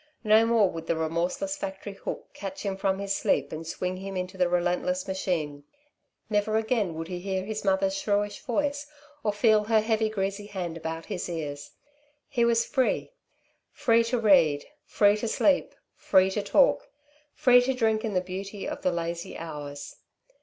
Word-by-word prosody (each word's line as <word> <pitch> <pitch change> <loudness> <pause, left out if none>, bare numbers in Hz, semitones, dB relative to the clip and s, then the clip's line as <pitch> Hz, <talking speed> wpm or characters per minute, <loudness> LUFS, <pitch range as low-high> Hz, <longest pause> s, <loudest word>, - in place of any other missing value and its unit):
No 220 +1 +5
more 230 -3 +4
would 165 0 -7
the 170 - +1
remorseless 170 - -1
factory 195 -4 -6
hook 195 - -6
catch 195 -1 -7
him 195 -2 -2
from 195 0 0
his 195 0 -2
sleep 140 0 +1
and 160 +1 -6
swing 180 +2 -3
him 195 0 -6
into 185 +1 -4
the 180 -2 +2
relentless 180 +1 0
machine. 165 -7 -2 0.6
Never 215 0 +1
again, 220 -6 0
would 165 0 -5
he 180 0 -5
hear 190 0 -2
his 215 +1 -4
mother's 195 -1 +2
shrewish 205 +1 -1
voice 285 +3 -1 0.4
or 210 - +2
feel 210 0 +3
her 220 0 +4
heavy, 220 0 +1
greasy 200 0 -3
hand 180 -5 -4
about 165 0 -5
his 190 -4 -4
ears. 145 -4 -5 0.5
He 240 -3 +1
was 235 0 +3
free 260 - 0 0.6
free 230 -1 +3
to 240 +2 0
read, 175 -10 +4 0.2
free 205 0 +4
to 230 - -3
sleep, 275 +5 +2 0.2
free 190 0 +3
to 205 - -1
talk, - - +3 0.5
free 245 -1 +6
to 260 +2 0
drink 220 -3 +1
in 215 -4 -2
the 180 - +3
beauty 195 +2 -6
of - - -5
the 185 - +1
lazy 170 0 -4
hours. 145 -3 -7
195 Hz, 175 wpm, -27 LUFS, 175-220 Hz, 0.6 s, free